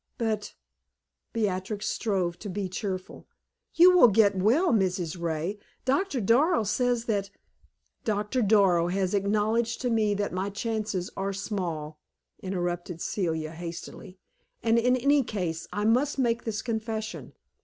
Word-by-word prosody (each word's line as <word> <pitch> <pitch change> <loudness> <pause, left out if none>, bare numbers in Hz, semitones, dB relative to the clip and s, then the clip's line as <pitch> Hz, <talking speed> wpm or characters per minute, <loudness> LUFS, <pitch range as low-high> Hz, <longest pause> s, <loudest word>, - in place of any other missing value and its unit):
"But" 220 -3 -2 0.8
Beatrix 205 -1 -2
strove 185 -6 -1
to 210 - -6
be 195 +1 -3
cheerful 185 -1 -5 0.5
"you 360 +2 +7
will 345 - +8
get 205 -2 +4
well, 235 - +3
Mrs. 180 -4 0
Ray. 170 +5 -2 0.3
Doctor 280 +2 +1
Darrow 240 - +3
says 240 +2 0
that 200 -3 -1 0.4
" - - -49
"Doctor 210 +3 0
Darrow 195 -5 +4
has 185 +1 -1
acknowledged 215 +3 +1
to 250 -2 0
me 215 -2 +2
that 205 -1 -2
my 190 +2 -1
chances 210 -3 -3
are 195 0 -2
small," 170 -7 -4 0.4
interrupted 175 -2 -3
Celia, 160 -5 -2
hastily. 170 +3 -8 0.5
"And, 230 0 +4
in 250 +2 +3
any 280 +3 +3
case, 180 -9 -3
I 205 +3 -2
must 255 +7 +2
make 235 -3 0
this 220 -2 -3
confession. 220 -2 -4
205 Hz, 135 wpm, -27 LUFS, 185-230 Hz, 0.8 s, will